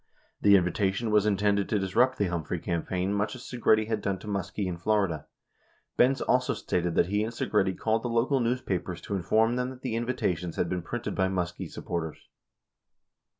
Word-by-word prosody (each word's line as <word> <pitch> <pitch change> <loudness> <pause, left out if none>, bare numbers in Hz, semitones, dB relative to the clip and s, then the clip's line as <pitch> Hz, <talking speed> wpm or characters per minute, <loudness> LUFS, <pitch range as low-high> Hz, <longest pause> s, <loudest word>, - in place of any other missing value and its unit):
78 105 - +2
The 100 - +9
invitation 95 +4 0
was 105 0 +4
intended 100 0 +2
to 105 - +2
disrupt 110 +7 +2
the 100 - +1
Humphrey 85 -1 -2
campaign 90 +3 -2
much 105 +2 -1
as 125 - -10
Segretti 110 -3 +2
had 110 -2 -1
done 100 -1 -1
to 105 - -12
Muskie 100 0 -2
in 90 -2 -2
Florida. 95 -6 0 0.7
Benz 130 +2 +3
also 125 0 +2
stated 90 -1 -1
that - - +4
he 105 +4 0
and 110 - -3
Segretti 100 -5 0
called 110 0 +1
the 120 - -3
local 120 +4 +2
news 125 +1 0
papers 90 -4 -3
to - - -6
inform 110 +6 +2
them 125 0 -1
that 130 -1 -11
the 125 -4 -2
invitations 90 -8 -1
had 85 - 0
been 90 -1 -1
printed 120 +7 -4
by 95 -1 +1
Muskie 90 -2 -3
supporters. 80 -3 -4
100 Hz, 195 wpm, -28 LUFS, 90-115 Hz, 0.7 s, The